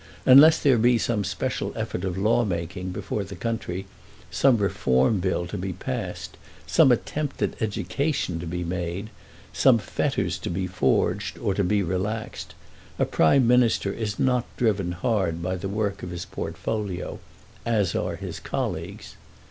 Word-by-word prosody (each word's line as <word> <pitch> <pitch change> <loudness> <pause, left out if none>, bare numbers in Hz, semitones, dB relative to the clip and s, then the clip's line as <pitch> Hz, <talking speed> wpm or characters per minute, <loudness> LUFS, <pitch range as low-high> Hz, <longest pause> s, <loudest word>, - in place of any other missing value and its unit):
Unless 150 +5 +8
there 135 -6 +5
be 120 +1 +4
some 115 -2 0
special - - -2
effort - - -3
of 95 -1 -2
lawmaking 95 -4 0
before 100 +3 -3
the 100 +1 -8
country, 95 -2 -3 0.5
some 135 -3 +4
reform 95 - +2
bill 90 -1 -1
to 85 - -5
be 95 0 -3
passed, - - -5 0.3
some 130 - +5
attempt 145 +4 -1
at - - -2
education 105 - -1
to 85 - -6
be 90 +1 -3
made, 90 +4 -4 0.4
some 130 -3 +5
fetters 105 - -1
to - - -4
be 90 +2 -2
forged 95 0 0
or 100 - -1
to 100 - 0
be 100 +2 +2
relaxed, 95 +5 -3 0.4
a - - +2
Prime 120 - +4
Minister 120 -5 +3
is 105 -3 -3
not 125 -2 +2
driven 100 -7 +1
hard 95 -5 0
by 90 +1 -1
the 95 +2 -4
work 100 -1 -2
of 90 - -6
his 85 0 -5
portfolio, 105 -5 -4 0.4
as 105 -6 +1
are - - -1
his - - -6
colleagues. - - -4
100 Hz, 155 wpm, -25 LUFS, 90-115 Hz, 0.5 s, Unless